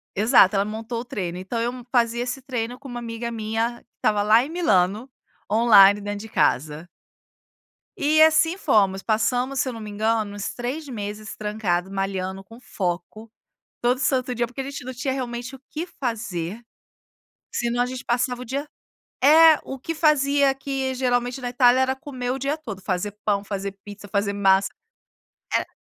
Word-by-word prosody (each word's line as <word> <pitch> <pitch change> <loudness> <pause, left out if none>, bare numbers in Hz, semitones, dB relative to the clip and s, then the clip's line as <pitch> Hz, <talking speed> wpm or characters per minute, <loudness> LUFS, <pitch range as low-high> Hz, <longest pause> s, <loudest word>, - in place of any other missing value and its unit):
Exato, 210 -1 +5
ela 195 0 +2
montou 225 +2 -5
o - - -10
treino. 180 -7 -4
Então 190 +6 -4
eu 235 +1 0 0.2
fazia 235 -1 +2
esse 255 +2 -4
treino 245 -2 -4
com 275 +2 -12
uma 245 -2 -5
amiga 235 0 -5
minha 225 +1 -2
que - - -32
estava 210 -1 +1
lá 220 +3 +5
em 275 - -6
Milano, 215 - +1 0.4
online, 205 -2 +6
dentro 205 0 -4
de 220 +2 -9
casa. 150 - 0 1.1
E 310 +2 +3
assim 320 +2 +5
fomos. 200 - +2
Passamos, 245 +5 0
se - - +1
eu - - -5
não 230 - -8
me 215 - -7
engano, 215 0 -1
uns 205 0 -4
3 265 +6 -4
meses 215 -3 -6
trancado 200 -4 -2
malhando 195 -1 -3
com 225 +5 -15
foco, 200 0 -4 0.5
todo 245 +1 +2
santo 255 -2 0
dia, 240 0 0
porque 250 +3 -8
a - - -3
gente 275 -2 -7
não 255 - -5
tinha, 255 +2 -2
realmente, 245 0 -5
o 265 - -12
que 320 +3 -4
fazer. 220 - -4 0.9
Senão 240 0 0
a - - +3
gente 250 0 -6
passava 250 +1 0
o 250 - -7
dia 280 +5 -3 0.6
é, 315 +2 +8
o 270 - -7
que 330 +5 -4
fazia 285 -3 +3
aqui, 270 -1 -3
geralmente, 245 0 0
na 245 - -3
Itália 245 0 +4
era 260 0 +2
comer 260 -3 -5
o 265 - -2
dia 280 +3 -1
todo. 220 -11 -8
Fazer 190 +2 -2
pão, 200 -1 +1
fazer 200 -1 -4
pizza, 205 0 -10
fazer 200 0 -1
massa. 195 -1 +3 0.8
Era - - -1
235 Hz, 180 wpm, -23 LUFS, 205-260 Hz, 1.1 s, é